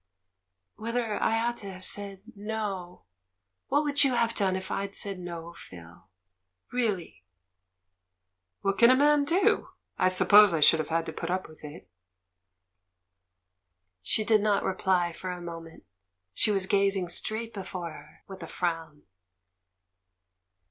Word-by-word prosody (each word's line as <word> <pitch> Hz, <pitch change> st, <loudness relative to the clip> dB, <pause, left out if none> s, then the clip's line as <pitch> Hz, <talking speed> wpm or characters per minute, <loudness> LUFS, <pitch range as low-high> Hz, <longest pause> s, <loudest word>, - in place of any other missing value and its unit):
"Whether 230 Hz, 0 st, -2 dB
I 225 Hz, -, +2 dB
ought 240 Hz, 0 st, -1 dB
to 200 Hz, -2 st, -7 dB
have 185 Hz, 0 st, -7 dB
said 200 Hz, -1 st, -2 dB
'no.' 200 Hz, -, -5 dB, 0.6 s
What 290 Hz, +2 st, +2 dB
would 290 Hz, -1 st, +2 dB
you 265 Hz, -3 st, +2 dB
have 230 Hz, -1 st, +1 dB
done 195 Hz, -4 st, +1 dB
if 190 Hz, +1 st, -5 dB
I'd 200 Hz, 0 st, -3 dB
said 195 Hz, -2 st, -2 dB
'no,' 170 Hz, -1 st, -7 dB
Phil? 85 Hz, -, -14 dB, 0.6 s
Real 235 Hz, -5 st, +1 dB
ly?" 175 Hz, -, -13 dB, 1.4 s
"What 195 Hz, 0 st, -1 dB
can 235 Hz, +1 st, +7 dB
a 255 Hz, -, +6 dB
man 290 Hz, +1 st, +3 dB
do? 345 Hz, +6 st, +2 dB, 0.3 s
I -, -, +4 dB
suppose 200 Hz, 0 st, +6 dB
I -, -, 0 dB
should 160 Hz, +2 st, +6 dB
have 155 Hz, -, -3 dB
had 165 Hz, 0 st, 0 dB
to -, -, -6 dB
put 165 Hz, -, -5 dB
up 185 Hz, +1 st, -2 dB
with 155 Hz, 0 st, -17 dB
it." 145 Hz, -10 st, -10 dB, 2.1 s
She 160 Hz, -, +1 dB
did 215 Hz, -1 st, +3 dB
not 205 Hz, -1 st, +1 dB
reply 185 Hz, -2 st, 0 dB
for 185 Hz, -, -7 dB
a 180 Hz, 0 st, -5 dB
moment. 165 Hz, -1 st, -9 dB, 0.5 s
She -, -, +1 dB
was 195 Hz, -2 st, +2 dB
gazing 195 Hz, -2 st, +1 dB
straight 220 Hz, +6 st, -1 dB
before 185 Hz, -4 st, -6 dB
her, 150 Hz, +1 st, -15 dB
with 190 Hz, -1 st, -10 dB
a 165 Hz, -, -7 dB
frown. 165 Hz, -4 st, -4 dB
190 Hz, 150 wpm, -28 LUFS, 170-215 Hz, 2.1 s, can